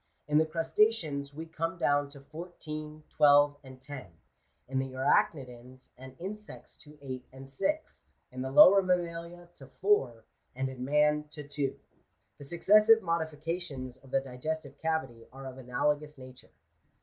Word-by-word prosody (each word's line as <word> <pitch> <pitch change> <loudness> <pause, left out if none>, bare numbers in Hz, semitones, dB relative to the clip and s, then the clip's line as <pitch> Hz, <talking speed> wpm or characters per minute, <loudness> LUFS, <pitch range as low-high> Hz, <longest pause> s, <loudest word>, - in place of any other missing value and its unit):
In 150 0 +4
the 160 - +2
crustaceans 165 -3 +1
we 160 +3 -7
come 165 +1 -3
down 145 -3 +1
to 140 -1 -13
fourteen, 155 -1 -8
twelve, 145 -1 +5
and 130 -1 -12
ten; 130 -4 -8 0.6
in 130 +1 -1
the 135 -1 -3
arachnidans 130 -1 -1
and 130 +1 -12
insects 210 +4 -8
to 150 0 -16
eight 130 -2 -6
and 135 +1 -11
six; 250 - -3 0.2
in 130 0 -6
the 130 - -3
lower 185 +8 +8
mammalia 175 -1 -2
to 135 - -13
four; 130 - +1 0.3
and 135 +1 -2
in 130 -1 -7
man 150 +2 +2
to 150 -1 -9
two. 145 -2 -2 0.6
The 140 - -10
successive 210 +8 +5
modifications 160 -5 -3
of 135 - -18
the 135 - +1
di 125 -2 -11
gestive 155 -1 -4
cavity 135 -8 -2
are 135 +1 -10
of 130 0 -8
analogous 145 +4 -1
nature. 130 -1 -13
145 Hz, 150 wpm, -30 LUFS, 130-165 Hz, 0.6 s, lower